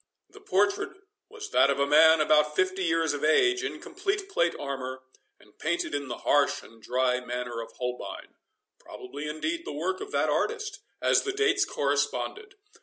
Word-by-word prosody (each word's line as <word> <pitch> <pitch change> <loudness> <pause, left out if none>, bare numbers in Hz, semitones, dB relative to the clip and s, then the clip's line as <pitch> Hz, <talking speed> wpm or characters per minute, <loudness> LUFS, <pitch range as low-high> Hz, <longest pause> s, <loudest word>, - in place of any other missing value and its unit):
The 415 - -15
portrait 205 - +1 0.4
was 430 -1 -9
that 140 - +5
of 140 - +1
a 140 - +3
man 160 +2 +6
about 150 0 +3
fifty 185 +2 +1
years 165 -2 +1
of 145 0 -4
age, 380 - +3
in - - -4
complete 395 +1 -3
plate 170 - +1
armour, 130 -2 -5 0.4
and 105 - -23
painted 170 0 -1
in 145 -1 -2
the 120 - -5
harsh 145 -1 +3
and 115 0 -17
dry 125 +1 +1
manner 125 -1 -4
of 115 - -10
Holbein—probably, 125 +2 -8
indeed, 320 - -3
the - - -6
work 380 +1 -2
of 410 0 -7
that - - +1
artist, 435 -3 -1 0.2
as - - +4
the 395 - -2
dates 395 -1 +2
corresponded. 415 0 -2
160 Hz, 170 wpm, -27 LUFS, -, 0.4 s, man